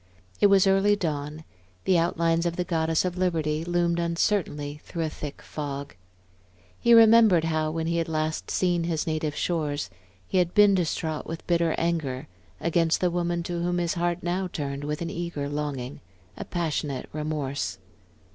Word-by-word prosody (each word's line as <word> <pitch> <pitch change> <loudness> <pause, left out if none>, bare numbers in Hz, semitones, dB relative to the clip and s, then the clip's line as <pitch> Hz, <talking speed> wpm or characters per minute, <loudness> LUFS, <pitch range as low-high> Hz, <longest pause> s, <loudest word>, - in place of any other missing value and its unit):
It 205 - +6
was 195 -1 +5
early 195 +2 +4
dawn; 155 -4 -3 0.4
the 185 -3 +4
outlines 165 0 +1
of 170 - -2
the 180 - -1
Goddess 165 -1 +1
of 180 0 -3
Liberty 160 -4 0
loomed 175 0 +1
uncertainly 165 -4 -1
through 165 - -4
a 160 - -1
thick 145 -2 -7
fog. 140 -2 -5 0.9
He 235 0 +6
remembered 225 -6 +7
how, 155 -1 0
when 160 +1 -2
he 170 +1 0
had 165 0 -1
last 155 0 -2
seen 175 -2 +1
his 165 -2 -1
native 155 -2 -2
shores, 150 - -1 0.3
he 185 - +1
had 175 0 0
been 205 -1 +7
distraught 160 -3 -1
with 165 0 -6
bitter 170 -2 +2
anger 155 -7 -1 0.3
against 165 -1 +2
the 180 -1 +1
woman 175 0 -1
to 175 -1 -3
whom 175 +1 0
his 170 -1 0
heart 175 0 -1
now 180 +2 -1
turned 145 -4 -4
with 150 +2 -3
an 165 - -4
eager 170 -4 -3
longing, 145 -3 -4 0.3
a - - -6
passionate 150 -6 -2
remorse. 145 -9 -3
165 Hz, 165 wpm, -26 LUFS, 150-175 Hz, 0.9 s, remembered